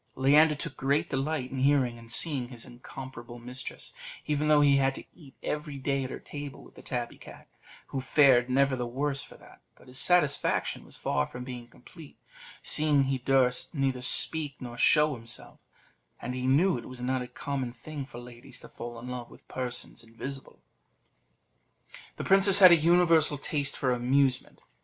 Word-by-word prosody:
Leander 150 Hz, +4 st, +5 dB
took 150 Hz, -, -4 dB
great 140 Hz, +2 st, 0 dB
delight 135 Hz, -1 st, -2 dB
in 135 Hz, -, -4 dB
hearing 130 Hz, -3 st, +2 dB
and 115 Hz, 0 st, -14 dB
seeing 135 Hz, 0 st, +1 dB
his 120 Hz, -2 st, -7 dB
incomparable 120 Hz, -1 st, -10 dB
mistress; 125 Hz, +2 st, -8 dB, 0.3 s
even 150 Hz, 0 st, -1 dB
though 150 Hz, -1 st, +5 dB
he 140 Hz, -1 st, +5 dB
had 135 Hz, 0 st, +1 dB
to -, -, -7 dB
eat 145 Hz, -6 st, -17 dB
every 150 Hz, -1 st, -4 dB
day 135 Hz, 0 st, -1 dB
at 130 Hz, -, -5 dB
her -, -, -6 dB
table 145 Hz, -1 st, -9 dB
with -, -, -17 dB
the -, -, -14 dB
tabby 120 Hz, -2 st, -5 dB
cat, -, -, -13 dB, 0.4 s
who 135 Hz, -, -3 dB
fared 130 Hz, -2 st, +4 dB
never 135 Hz, +1 st, +2 dB
the 125 Hz, -1 st, -3 dB
worse 140 Hz, +3 st, -2 dB
for -, -, -12 dB
that; -, -, -18 dB
but -, -, -20 dB
his 130 Hz, 0 st, -4 dB
satisfaction 175 Hz, -6 st, +1 dB
was -, -, -10 dB
far 70 Hz, -, -1 dB
from 125 Hz, -, -8 dB
being 125 Hz, -2 st, -8 dB
complete, 145 Hz, +6 st, -15 dB, 0.5 s
seeing 150 Hz, -2 st, +3 dB
he 135 Hz, -1 st, -1 dB
durst 130 Hz, +3 st, +1 dB
neither 135 Hz, -3 st, -1 dB
speak 145 Hz, +2 st, +2 dB
nor 120 Hz, -2 st, -8 dB
show 150 Hz, +4 st, +4 dB
himself; 115 Hz, -2 st, -7 dB, 0.6 s
and 125 Hz, -, -5 dB
he 125 Hz, 0 st, -3 dB
knew 155 Hz, +4 st, +3 dB
it -, -, -11 dB
was 130 Hz, -1 st, -10 dB
not 130 Hz, +1 st, -1 dB
a 125 Hz, -, -6 dB
common 135 Hz, -2 st, -4 dB
thing 140 Hz, +4 st, -8 dB
for 130 Hz, -3 st, -12 dB
ladies 120 Hz, 0 st, -11 dB
to -, -, -12 dB
fall 120 Hz, 0 st, -8 dB
in 120 Hz, +2 st, -9 dB
love 125 Hz, -1 st, -6 dB
with -, -, -18 dB
persons 125 Hz, -2 st, -4 dB
invisible. 130 Hz, +4 st, -9 dB, 1.6 s
The -, -, -6 dB
princess 195 Hz, 0 st, +7 dB
had 185 Hz, -3 st, +10 dB
a -, -, +9 dB
universal 165 Hz, -2 st, +3 dB
taste 140 Hz, 0 st, -2 dB
for 130 Hz, -2 st, 0 dB
amusement. 130 Hz, +1 st, +1 dB
135 Hz, 180 wpm, -28 LUFS, 125-145 Hz, 1.6 s, had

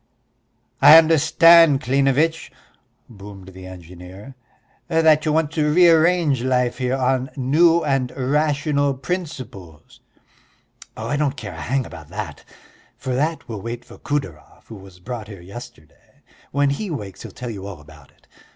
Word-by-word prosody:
"I 160 Hz, -, +10 dB
understand, 165 Hz, -1 st, +5 dB
Klinevitch," 140 Hz, +5 st, 0 dB, 0.6 s
boomed 100 Hz, -3 st, -12 dB
the 95 Hz, 0 st, -12 dB
engineer, 90 Hz, +6 st, -12 dB, 0.5 s
"that 160 Hz, -2 st, +3 dB
you 155 Hz, -, +1 dB
want 155 Hz, -1 st, 0 dB
to 150 Hz, -2 st, 0 dB
rearrange 165 Hz, -4 st, +3 dB
life 125 Hz, -1 st, 0 dB
here 125 Hz, 0 st, -1 dB
on 130 Hz, 0 st, 0 dB
new 165 Hz, +6 st, +3 dB
and 135 Hz, -3 st, -1 dB
rational 145 Hz, +1 st, 0 dB
principles." 130 Hz, -, -7 dB, 1.0 s
"Oh, -, -, -6 dB
I 145 Hz, -, -1 dB
don't 145 Hz, -1 st, -1 dB
care 110 Hz, -4 st, -7 dB
a -, -, -9 dB
hang 135 Hz, +1 st, -1 dB
about 80 Hz, -4 st, -11 dB
that! 100 Hz, +5 st, -7 dB, 0.5 s
For 130 Hz, -, -4 dB
that 155 Hz, +5 st, -2 dB
we'll 110 Hz, -4 st, -7 dB
wait 120 Hz, +2 st, -7 dB
for -, -, -15 dB
Kudeyarov 95 Hz, -, -5 dB
who 110 Hz, -, -9 dB
was 95 Hz, -2 st, -15 dB
brought 110 Hz, +2 st, -7 dB
here 100 Hz, -3 st, -11 dB
yesterday. 90 Hz, -5 st, -14 dB, 0.3 s
When 140 Hz, 0 st, +1 dB
he 195 Hz, +9 st, -4 dB
wakes 105 Hz, -, -7 dB
he'll -, -, -9 dB
tell 125 Hz, -2 st, -7 dB
you 100 Hz, -2 st, -8 dB
all 95 Hz, -6 st, -9 dB
about 75 Hz, -1 st, -17 dB
it. -, -, -30 dB
130 Hz, 150 wpm, -21 LUFS, 100-155 Hz, 1.0 s, I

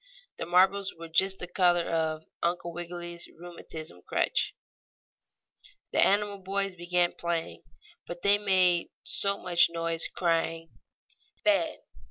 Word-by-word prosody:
The -, -, -3 dB
marbles 190 Hz, +2 st, +3 dB
were 165 Hz, 0 st, -9 dB
just 190 Hz, +4 st, +2 dB
the 180 Hz, -, -5 dB
color 175 Hz, -1 st, +3 dB
of 160 Hz, -1 st, -1 dB, 0.2 s
Uncle 170 Hz, 0 st, -1 dB
Wiggily's 175 Hz, 0 st, -6 dB
rheumatism 160 Hz, -, -9 dB
crutch. -, -, 0 dB, 1.4 s
The -, -, +4 dB
animal 205 Hz, 0 st, +2 dB
boys 195 Hz, +1 st, -2 dB
began 175 Hz, 0 st, +1 dB
playing, 165 Hz, -, -4 dB, 0.4 s
but 175 Hz, 0 st, -8 dB
they 200 Hz, +1 st, +6 dB
made 185 Hz, -4 st, +3 dB
so 200 Hz, 0 st, 0 dB
much 175 Hz, -2 st, +3 dB
noise, 165 Hz, -1 st, -1 dB
crying 165 Hz, -1 st, 0 dB, 0.7 s
"Fen!" 315 Hz, 0 st, +2 dB
175 Hz, 120 wpm, -28 LUFS, 165-190 Hz, 1.4 s, they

